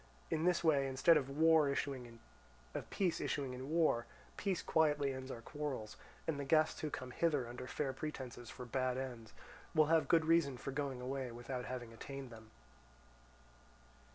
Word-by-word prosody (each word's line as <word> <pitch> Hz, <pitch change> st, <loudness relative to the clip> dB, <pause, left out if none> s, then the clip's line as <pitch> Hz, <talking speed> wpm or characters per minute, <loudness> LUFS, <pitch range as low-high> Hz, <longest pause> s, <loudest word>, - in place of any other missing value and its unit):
In 160 Hz, 0 st, +1 dB
this 180 Hz, -1 st, +3 dB
way 145 Hz, -4 st, +4 dB
instead 135 Hz, +5 st, +5 dB
of 140 Hz, -3 st, +1 dB
war 155 Hz, +1 st, +5 dB
issuing 135 Hz, -3 st, -2 dB, 0.7 s
in 140 Hz, -8 st, -1 dB
war, 155 Hz, -7 st, +3 dB, 0.3 s
peace 195 Hz, -4 st, -1 dB
quietly 145 Hz, -3 st, +2 dB
ends 130 Hz, 0 st, -6 dB
our 115 Hz, -3 st, -6 dB
quarrels; 140 Hz, -8 st, -4 dB, 0.3 s
and 160 Hz, -3 st, -1 dB
the -, -, -2 dB
guests 155 Hz, +3 st, +3 dB
who 155 Hz, -, -2 dB
come 130 Hz, -3 st, -5 dB
hither 145 Hz, -4 st, +1 dB
under 125 Hz, +1 st, -7 dB
fair 135 Hz, -1 st, -2 dB
pretences 130 Hz, -4 st, -6 dB
for 125 Hz, -, -7 dB
bad 130 Hz, +1 st, 0 dB
ends, 120 Hz, -5 st, -5 dB, 0.4 s
will 155 Hz, -, +6 dB
have 160 Hz, -, +4 dB
good 165 Hz, -2 st, +4 dB
reason 160 Hz, -5 st, +3 dB
for 135 Hz, -, -5 dB
going 135 Hz, -2 st, -2 dB
away 130 Hz, 0 st, -3 dB
without 125 Hz, +1 st, -5 dB
having 120 Hz, -2 st, -5 dB
attained 135 Hz, +2 st, -7 dB
them. 110 Hz, -1 st, -12 dB
135 Hz, 155 wpm, -37 LUFS, 125-155 Hz, 0.7 s, will